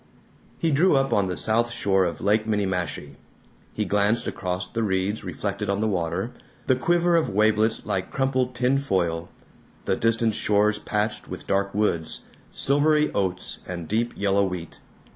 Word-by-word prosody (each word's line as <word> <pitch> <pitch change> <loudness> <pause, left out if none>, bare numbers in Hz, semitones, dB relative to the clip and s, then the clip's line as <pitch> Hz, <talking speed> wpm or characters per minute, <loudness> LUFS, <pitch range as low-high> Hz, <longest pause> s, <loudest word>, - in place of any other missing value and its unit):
He 165 - 0
drew 155 +4 +4
up 135 0 +2
on 100 -2 +2
the 90 - -3
south 115 +2 +2
shore 95 -4 +2
of 85 -2 -3
Lake 105 +2 +2
Minniemashie. 95 -6 -2 0.5
He 105 - -2
glanced 105 +4 +1
across 90 0 -3
the 115 +5 -4
reeds 100 0 -1
reflected 100 0 -4
on 100 0 0
the 110 - +1
water, 85 -5 -1 0.3
the 130 - +3
quiver 175 +5 +2
of 165 - +2
wavelets 110 +2 +2
like 95 - -2
crumpled 130 -2 0
tinfoil, 95 -10 0 0.6
the - - +1
distant 115 0 +1
shores 105 +1 +2
patched 105 +1 -2
with - - -7
dark 100 0 0
woods, 85 -7 0 0.3
silvery 150 +2 +2
oats 95 -2 -2
and 85 -3 -5
deep 115 +5 0
yellow 100 0 +2
wheat. 90 -3 -5
105 Hz, 155 wpm, -25 LUFS, 95-120 Hz, 0.6 s, drew